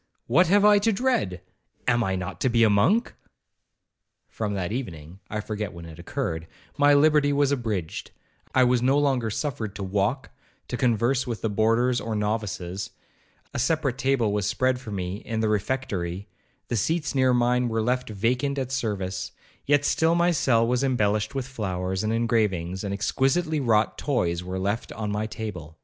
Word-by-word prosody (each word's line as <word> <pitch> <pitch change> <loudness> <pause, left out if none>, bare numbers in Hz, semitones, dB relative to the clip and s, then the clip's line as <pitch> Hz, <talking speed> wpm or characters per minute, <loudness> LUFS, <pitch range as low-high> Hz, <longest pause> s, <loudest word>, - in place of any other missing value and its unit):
what 165 +9 +4
have 205 +3 +4
I 210 -1 +7
to 225 +3 +2
dread?—am 115 - -1
I 95 -3 0
not 95 -1 -5
to 130 - +3
be 115 -1 +3
a 110 - +5
monk?' 155 - +3 1.1
From 105 -2 -3
that 95 0 -2
evening, 90 - -6
(I 105 - -3
forget 105 -2 -4
when 85 -1 -9
it 80 -1 -11
occurred), 80 0 -3 0.3
my 145 0 +5
liberty 150 0 +4
was 145 -1 +2
abridged; 110 - -3 0.5
I 130 - +6
was 125 -1 +3
no 135 +3 +3
longer 135 -6 +1
suffered 110 -4 -3
to 100 - -5
walk, 100 +7 -1 0.4
to - - -2
converse 125 +2 +1
with 115 -3 -4
the 110 - 0
boarders 115 +4 +2
or 115 -1 -3
novices,—a 105 -4 -5
separate 135 -1 0
table 130 -6 +1
was 105 -2 0
spread 130 0 +1
for 125 - -10
me 95 -2 -3
in 110 +1 -4
the 110 -1 +1
refectory,—the 100 -3 -4
seats 150 - 0
near 130 -2 +3
mine 125 0 +2
were 110 -1 0
left 125 +1 0
vacant 125 +7 0
at 130 -2 -2
service,—yet 105 +5 -2
still 160 +2 +2
my 175 +1 +3
cell 120 -8 +3
was 125 +2 +1
embellished 110 -3 +1
with 135 -2 -2
flowers 95 -5 -3
and 110 - 0
engravings, 105 -6 0
and 100 - -3
exquisitely 135 - +1
wrought 110 -5 +2
toys 90 - 0
were 90 +1 -4
left 100 +4 -2
on 105 -2 -3
my 105 +1 -1
table. 90 -9 -7
115 Hz, 165 wpm, -25 LUFS, 100-135 Hz, 1.1 s, I